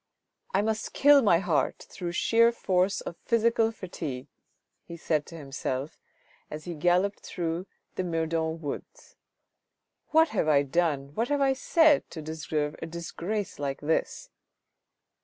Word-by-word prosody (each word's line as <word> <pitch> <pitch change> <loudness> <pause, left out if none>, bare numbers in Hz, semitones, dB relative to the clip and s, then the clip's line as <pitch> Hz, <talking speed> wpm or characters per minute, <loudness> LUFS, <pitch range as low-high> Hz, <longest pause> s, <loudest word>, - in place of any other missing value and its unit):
" - - -57
I 195 +2 +2
must 220 0 -2
kill 285 0 +6
my 200 -8 +5
heart 170 -4 0
through 175 -2 -5
sheer 230 +5 +4
force 190 -4 +1
of 170 - -7
physical 230 -1 +2
fatigue," 155 - -6 0.6
he 170 - -9
said 155 -3 -1
to 165 - -9
himself 135 -1 -4 0.5
as 155 0 -7
he 175 - -4
galloped 180 +5 +1
through 170 +1 -4 0.3
the 185 - -2
Meudon 165 -1 -1
woods. 145 -3 -7 0.5
" - - -57
What 320 0 +4
have 155 - 0
I 145 -2 +4
done, 140 -2 0
what 230 +8 0
have 290 +1 0
I 270 -1 +4
said 310 +2 +3
to 160 - -7
deserve 155 -1 -3
a 165 - -4
disgrace 170 +5 -4
like 140 -1 -3
this 160 - -1
170 Hz, 150 wpm, -28 LUFS, 155-220 Hz, 0.6 s, kill